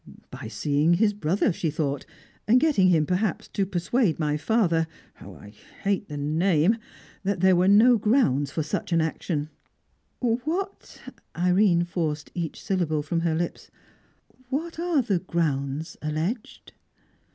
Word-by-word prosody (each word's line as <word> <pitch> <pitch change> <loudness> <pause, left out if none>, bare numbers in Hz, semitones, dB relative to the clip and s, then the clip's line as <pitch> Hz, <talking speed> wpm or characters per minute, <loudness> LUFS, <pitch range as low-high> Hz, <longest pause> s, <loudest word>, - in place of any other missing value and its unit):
"By - - -7
seeing 150 +4 +1
his 210 +3 +2
brother, 190 0 0
she 165 - -2
thought, 145 -2 -2 0.4
and 240 +4 +6
getting 275 -11 +3
him, 165 -4 +3
perhaps, 185 +4 -1
to 195 -1 -1
persuade 185 - 0
my 150 -2 0
father 165 -1 +1 0.3
how - - -12
I 100 - -13 0.3
hate 200 0 0
the 150 - -6
name! 165 +7 +2 0.4
that 195 -2 -1
there 190 -1 +5
were 180 +1 +3
no 220 +4 +6
grounds 200 - +2
for 155 +3 -2
such 150 - -4
an 165 - +3
action." 160 -1 -2 0.7
"What" 305 +12 -3 0.4
Irene 180 0 +3
forced 160 -4 -3
each 170 -3 -4
syllable 160 -6 0
from 165 +3 -1
her 165 -1 0
lips 170 +1 -4 0.8
"what 320 +5 -3
are 335 -6 +1
the 200 -6 0
grounds 155 -4 -2
alleged?" 160 +10 -4
175 Hz, 140 wpm, -25 LUFS, 155-210 Hz, 0.8 s, and